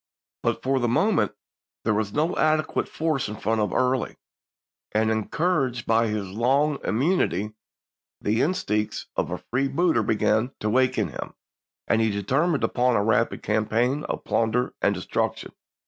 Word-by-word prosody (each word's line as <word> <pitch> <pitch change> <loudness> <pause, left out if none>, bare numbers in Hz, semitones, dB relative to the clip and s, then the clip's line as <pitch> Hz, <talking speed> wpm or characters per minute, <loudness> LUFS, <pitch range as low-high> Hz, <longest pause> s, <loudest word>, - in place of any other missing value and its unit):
But - - -1
for 135 0 +1
the 120 - +1
moment 120 - +2 0.5
there 110 - +2
was 105 -1 -1
no 155 - 0
adequate 155 0 +1
force 155 -7 -1
in 105 - -5
front 110 +1 0
of 105 - 0
Early, 130 0 0 0.8
and 110 +1 +2
encouraged 130 - 0
by 115 +1 +3
his 105 -2 -2
long 135 +7 +1
im 110 - -1
munity, 110 - +1 0.7
the 110 +2 0
instincts 105 - -1
of - - -1
a - - -3
freebooter 135 +2 +1
began 110 +3 +1
to 105 - -1
wake 130 +2 +2
in - - 0
him, - - -7 0.5
and 115 - +3
he 110 - +2
determined 135 - 0
upon 125 0 +2
a 100 - +2
rapid 115 +2 +1
campaign 115 +6 +1
of - - -4
plunder 115 +2 0
and - - +2
destruction. - - -2
120 Hz, 155 wpm, -25 LUFS, 110-140 Hz, 0.8 s, by